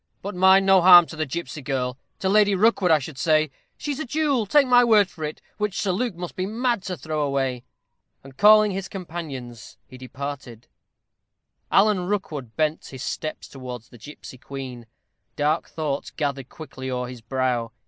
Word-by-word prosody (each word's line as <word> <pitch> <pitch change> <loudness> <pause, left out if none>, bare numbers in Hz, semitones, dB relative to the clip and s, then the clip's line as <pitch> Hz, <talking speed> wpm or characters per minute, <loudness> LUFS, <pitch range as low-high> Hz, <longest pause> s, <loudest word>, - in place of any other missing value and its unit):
But 200 +2 -4
mind, 190 +1 +5
no 195 -1 +5
harm 175 -1 +9
to 160 - -10
the 155 -1 -2
gipsy 160 +1 -5
girl 125 -1 -2 0.2
to 195 - -2
Lady 205 0 +4
Rookwood, 200 -2 +3
I 160 - +6
should 140 -1 -8
say. 155 -1 +2 0.3
She's 290 -1 -4
a - - -2
jewel, 280 -5 0
take 290 +6 +5
my 245 -1 +5
word 215 -4 +5
for 160 -3 -10
it, 150 0 -5 0.2
which 210 -1 -2
Sir 195 - 0
Luke 220 +2 -2
must 175 0 -7
be 185 0 -2
mad 235 0 -1
to 185 -2 -4
throw 155 -1 -3
away." 135 -3 -1 0.6
And 135 -1 -14
calling 210 +2 +6
his 195 0 -4
companions, 145 - -8
he 130 - -14
departed. 130 -3 -7 1.1
Alan 195 -3 +3
Rookwood 155 - -4
bent 155 0 -1
his 130 0 -8
steps 155 - -5
towards 125 -4 -9
the 120 - -16
gipsy 130 0 -11
queen. 130 -4 -8 0.5
Dark 150 +3 0
thoughts 150 -3 -3
gathered 140 -4 -4
quickly 135 -4 -8
o'er 125 -1 -3
his 125 -1 -10
brow. 120 -1 -1
155 Hz, 180 wpm, -23 LUFS, 130-195 Hz, 1.1 s, harm